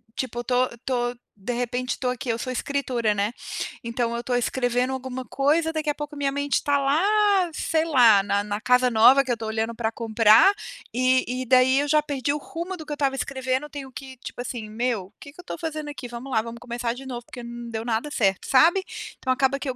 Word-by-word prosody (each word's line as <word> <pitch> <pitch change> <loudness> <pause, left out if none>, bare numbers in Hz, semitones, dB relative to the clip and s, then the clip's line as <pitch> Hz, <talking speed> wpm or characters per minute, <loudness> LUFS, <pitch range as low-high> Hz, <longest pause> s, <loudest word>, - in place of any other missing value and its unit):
tipo, 240 -2 -3
eu - - -1
estou 250 +1 +2
estou 245 0 -2 0.3
de 245 +5 -3
repente, 245 +1 -2
estou 250 -2 -1
aqui, 250 +1 -6
eu 230 -1 0
sou 255 +1 -4
escritora, 250 -5 -1
né. 200 +3 0 0.5
Então 235 0 -1
eu 235 - -2
estou 245 +1 -2
escrevendo 245 +1 0
alguma 260 0 -4
coisa, 310 +5 +1
daqui 310 -1 -2
a 290 - 0
pouco 295 0 -6
minha 280 -1 0
mente 285 0 0
tá 285 0 +2
lá, 280 +4 +2 0.5
sei 320 0 0
lá, 240 -10 +6
na 205 0 0
na 205 0 -3
casa 250 +2 +3
nova 250 +5 +7
que 255 - -3
eu - - +2
estou 225 -1 -6
olhando 220 +1 -1
para 225 -1 -2
comprar, 225 - +5 0.4
e 255 0 +1
e - - -4
daí 255 +2 +5
eu 290 - 0
já 305 +1 +4
perdi 285 -1 -1
o 295 - -1
rumo 340 +5 -6
do 315 -3 -9
que 300 - -9
eu - - -1
estava 275 -2 0
escrevendo, 265 +1 -2
tenho 280 -2 -7
que, 260 0 -9
tipo, 245 - -8
assim: 240 -3 -5
"Meu, 220 -4 -2
que 285 - -11
que 310 - -22
eu 360 - -9
estou - - -6
fazendo 310 -2 -4
aqui? 280 -4 -7
Vamos 240 +3 -8
lá, 220 - +2
vamos 230 +1 -8
começar 240 -1 -3
de 265 +2 -10
novo 245 -2 -6
porque 245 -1 -9
não 235 0 -7
deu 225 0 -4
nada 235 +5 -1
certo", 195 -8 +1
sabe. 335 +8 +5 0.3
Então 260 - -1
acaba 265 +2 +2
que 280 - -4
eu 255 - -3
255 Hz, 235 wpm, -24 LUFS, 235-280 Hz, 0.5 s, nova